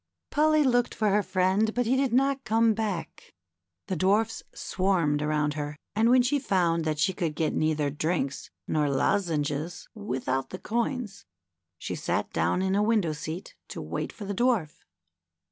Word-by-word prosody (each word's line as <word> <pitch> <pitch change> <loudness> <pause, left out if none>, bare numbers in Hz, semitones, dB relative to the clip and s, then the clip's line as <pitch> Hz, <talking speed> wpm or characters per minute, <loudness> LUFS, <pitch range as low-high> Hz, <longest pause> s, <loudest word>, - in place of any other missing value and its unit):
Polly 310 +1 +4
looked 245 -3 +2
for 215 -1 +1
her 205 +1 +3
friend, 195 +3 +1
but 245 0 +1
he 245 +4 +2
did 265 -2 +1
not 270 +2 +2
come 225 0 +3
hack. 205 -6 -4 0.5
The 190 - -2
dwarfs 205 +6 +1
swarmed 175 -6 0
around 150 -1 0
her, 145 0 -4 0.2
and 220 +2 +3
w'hen 250 +1 +5
she 285 +4 +1
found 175 - +1
that 155 -1 0
she 175 +5 +2
could 165 -4 -2
get 160 -1 0
neither 155 -2 +1
drinks 150 -2 -2 0.2
nor 150 -2 +1
lozenges 150 +1 -1
without 135 - -2
the 185 - -6
coins, 230 -1 -3 0.5
she - - -5
sat - - -2
down 185 - +1
in 190 0 +1
a 200 - +3
window 210 -7 +2
seat 160 +4 -6
to - - -7
wait - - -4
for 210 - -9
the 200 - -3
Dwarf. 215 -9 +1
190 Hz, 165 wpm, -27 LUFS, 155-225 Hz, 0.5 s, w'hen